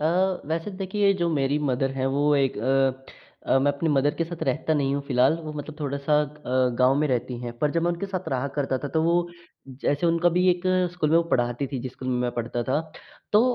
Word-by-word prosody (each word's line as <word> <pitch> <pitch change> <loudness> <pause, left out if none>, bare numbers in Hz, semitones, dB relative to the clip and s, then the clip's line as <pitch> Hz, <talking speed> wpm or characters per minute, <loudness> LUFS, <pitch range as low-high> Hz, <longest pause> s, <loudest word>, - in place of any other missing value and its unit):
अ, 180 +4 +1
वैसे 165 +5 -2
देखिए 200 +1 +2
जो 175 -3 0
मेरी 140 -1 +1
मदर 130 +1 0
है 130 - +1
वो 145 +1 +3
एक 135 -4 +1
अ 135 +2 +1 0.4
अ, - - +4
मैं 140 +2 +3
अपनी 150 +4 -2
मदर 145 0 +2
के 165 - -1
साथ 170 0 -7
रहता 150 +4 0
नहीं 140 -2 +1
हूँ 140 - -2
फ़िलहाल 130 +5 +3
वो 155 - -6
मतलब 150 0 -7
थोड़ा-सा 140 +1 -1
अ, 130 -4 -1
गाँव 130 +1 +5
में 150 - +2
रहती 125 -1 -1
हैं। 120 -1 -5
पर 150 +2 +1
जब 165 +2 0
मैं 175 - +2
उनके 175 +3 -3
साथ 185 -1 -4
रहा 130 +1 -1
करता 135 -2 0
था, 145 - -5
तो 160 +3 0
वो 170 +1 +2 0.5
जैसे 145 +4 +1
उनका 170 +1 +3
भी 180 +1 +3
1 175 0 -1 0.3
स्कूल 155 -4 -1
में 165 - +5
वो 170 - +5
पढ़ाती 120 +2 0
थी 130 0 -4
जिस 130 0 -6
स्कूल 130 - -7
में 125 - +1
मैं 125 0 0
पढ़ता 120 0 -2
था। 130 +6 0 0.5
तो 210 - +6
145 Hz, 240 wpm, -25 LUFS, 130-165 Hz, 0.5 s, तो